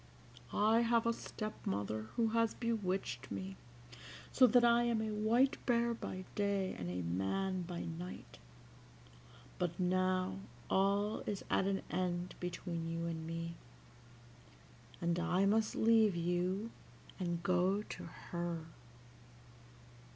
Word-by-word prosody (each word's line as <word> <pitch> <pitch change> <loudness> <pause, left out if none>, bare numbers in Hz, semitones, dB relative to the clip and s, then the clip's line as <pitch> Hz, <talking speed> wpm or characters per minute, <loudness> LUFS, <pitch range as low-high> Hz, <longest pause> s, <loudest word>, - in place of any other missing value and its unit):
I 220 +2 +4
have 235 -1 +3
a 230 - +3
step 215 -1 -5
mother 105 +2 -2
who 230 -2 +2
has 230 0 +2
bewitched 190 - -2
me 95 -1 -5 0.8
so 255 - +7
that 240 +1 +5
I 235 0 +5
am 235 -2 +1
a 220 0 -1
white 230 +6 +2
bear 235 -1 +3
by 185 -4 -5
day 200 -2 0
and 90 -1 -5
a 90 0 -3
man 140 - -1
by 175 0 -4
night; 170 +2 -7 1.2
but 175 -1 -1
now 185 - +1 0.3
all 200 +2 +2
is 205 -2 -3
at 190 - +3
an 195 -1 0
end 180 -1 -1
between 170 -2 -3
you 165 0 -2
and 160 -1 -4
me, 165 0 -4 1.4
and 170 0 0
I 180 +2 +2
must 215 +2 +2
leave 220 -3 +5
you, 180 +5 0 0.5
and 175 -2 -2
go 185 +3 +2
to - - -7 0.3
her. 170 -2 -2
185 Hz, 130 wpm, -36 LUFS, 170-215 Hz, 1.4 s, so